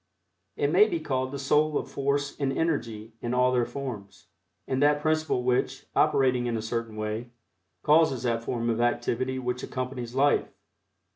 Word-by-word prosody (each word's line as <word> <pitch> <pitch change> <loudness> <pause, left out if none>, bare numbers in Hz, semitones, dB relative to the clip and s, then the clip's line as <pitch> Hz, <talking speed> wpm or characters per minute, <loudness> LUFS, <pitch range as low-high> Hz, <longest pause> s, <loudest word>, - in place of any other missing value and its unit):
It - - 0
may 425 - +6
be 340 - -2
called 130 - -2
the 140 - -4
soul 150 +2 +2
of - - -5
Force 140 0 -1
and 140 -2 0
Energy 115 -9 -2
in 120 +1 -2
all 125 0 +3
their 120 -2 +1
forms, 120 -7 -7 0.4
and 130 0 -1
that 145 0 +4
principle 155 -4 0
which, 125 0 0
operating 125 -2 +3
in 115 -1 -1
a - - -3
certain 115 -1 -3
way, 110 +2 -4 0.5
causes 150 -5 +4
that 115 -2 0
form 115 -1 -2
of 115 +1 -1
activity 125 +2 0
which 125 -1 -3
accompanies 125 -2 -5
Life. 140 +2 +3
125 Hz, 165 wpm, -27 LUFS, 120-140 Hz, 0.5 s, may